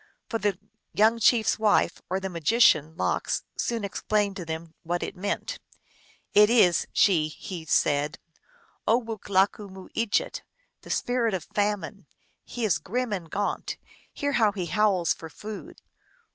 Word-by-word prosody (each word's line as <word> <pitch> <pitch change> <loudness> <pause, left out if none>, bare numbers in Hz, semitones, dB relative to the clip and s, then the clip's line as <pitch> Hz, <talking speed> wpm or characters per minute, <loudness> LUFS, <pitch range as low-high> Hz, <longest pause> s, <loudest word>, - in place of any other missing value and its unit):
But 225 - -2
the 205 -3 +1 0.4
young 225 +2 +4
chief 230 0 +4
s - - +1
wife, 210 -5 +2
or 190 +1 0
the 195 - -4
magician 165 -3 +3
Lox, - - -1
soon 230 -3 -2
explained 205 0 0
to 180 - -6
them 160 0 -6
what 175 +1 -2
it - - -5
meant. 205 - -3 0.4
" - - -31 0.3
It 210 +1 +7
is," 195 -8 +4
she 165 -6 +3
he 165 +2 -8
said, 150 0 +1 0.4
" 475 -1 -34
Owoolakumooejit, 205 -2 0 0.4
the - - -14
Spirit 240 -4 0
of 180 - -5
Famine. 205 -1 -1 0.4
He 240 -2 -4
is 180 -8 +2
grim 230 +7 -2
and 175 -5 -4
gaunt; 205 +5 -2 0.3
hear 285 0 -2
how 220 -6 +3
he 185 -3 -3
howls 185 0 +2
for 160 - -10
food 210 +6 -9
200 Hz, 145 wpm, -26 LUFS, 175-220 Hz, 0.4 s, It